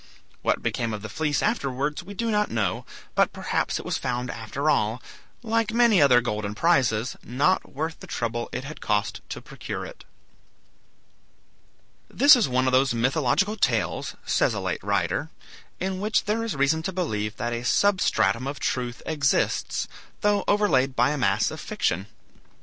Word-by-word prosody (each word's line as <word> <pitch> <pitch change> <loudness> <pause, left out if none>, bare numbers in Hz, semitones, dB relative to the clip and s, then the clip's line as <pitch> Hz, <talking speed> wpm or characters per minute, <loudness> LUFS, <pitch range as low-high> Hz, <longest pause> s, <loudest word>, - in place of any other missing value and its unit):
What - - 0
became 115 -2 -1
of 105 - -9
the 110 - -6
fleece 150 0 0
afterwards 145 - -1
we 200 +3 -10
do 230 +2 -1
not 210 0 +1
know, 110 -6 -1 0.3
but - - +3
perhaps - - -1
it - - -7
was - - -1
found 125 -1 -2
after 120 +6 -4
all, 110 -5 +2 0.4
like 225 -1 0
many 235 -6 +5
other 125 -4 +6
golden 105 -3 -3
prizes, 125 -6 +2
not 145 +9 0
worth 160 +3 -3
the - - -11
trouble 120 0 -3
it 125 - -4
had 150 +3 -9
cost 105 0 -1
to - - -6
procure - - -6
it. - - -11 2.1
This 285 +1 +7
is 235 - +1
one 130 +1 +1
of 130 - +2
those 130 -1 +3
mythological 135 - +1
tales, - - 0
says - - +2
a - - -2
late - - -3
writer, - - 0 0.5
in 190 0 -2
which 210 +2 +1
there 215 +2 0
is 230 -8 -3
reason 140 +3 +2
to 190 - -3
believe 105 - -2
that 120 -1 -2
a 120 0 -3
substratum 185 -7 +2
of 140 0 -5
truth 125 -1 -2
exists, 145 -3 0 0.3
though 205 -1 +2
overlaid 140 -11 +2
by 140 - +3
a 150 - -2
mass 100 -3 +2
of - - -7
fiction. 95 +4 -1
140 Hz, 165 wpm, -25 LUFS, 120-190 Hz, 2.1 s, This